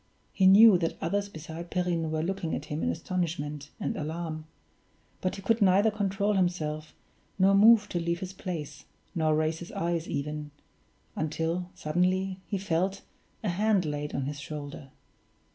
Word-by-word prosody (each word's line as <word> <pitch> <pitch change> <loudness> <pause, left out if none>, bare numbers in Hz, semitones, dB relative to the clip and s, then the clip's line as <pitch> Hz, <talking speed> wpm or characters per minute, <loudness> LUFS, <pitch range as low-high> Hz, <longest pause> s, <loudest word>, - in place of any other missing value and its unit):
He 190 -2 +4
knew 200 0 +8
that 165 -1 -1
others 200 +4 -1
besides 160 0 -8
Perrine 175 -3 0
were 155 0 -1
looking 175 -2 -2
at 150 - -5
him 150 0 -4
in - - +1
astonishment 150 - -3
and - - -2
alarm; 155 0 -4 0.7
but 185 - -1
he 195 - -9
could 225 +3 +2
neither 200 +3 +5
control 200 0 0
himself, 160 -5 -1 0.4
nor 195 +1 +5
move 210 +1 +7
to 175 - -1
leave 170 0 -1
his 190 0 -6
place, 160 -6 -6 0.3
nor 155 -2 +2
raise 155 +1 0
his 175 - -9
eyes 170 0 -1
even 150 +1 -3 0.7
until 165 +3 -2
suddenly 185 +4 0
he 200 - -1
felt 190 +1 -1 0.4
a 210 - 0
hand 200 +1 +2
laid 150 -1 -3
on 135 - -1
his 145 +1 -4
shoulder. 145 -1 -7
170 Hz, 160 wpm, -29 LUFS, 155-190 Hz, 0.7 s, knew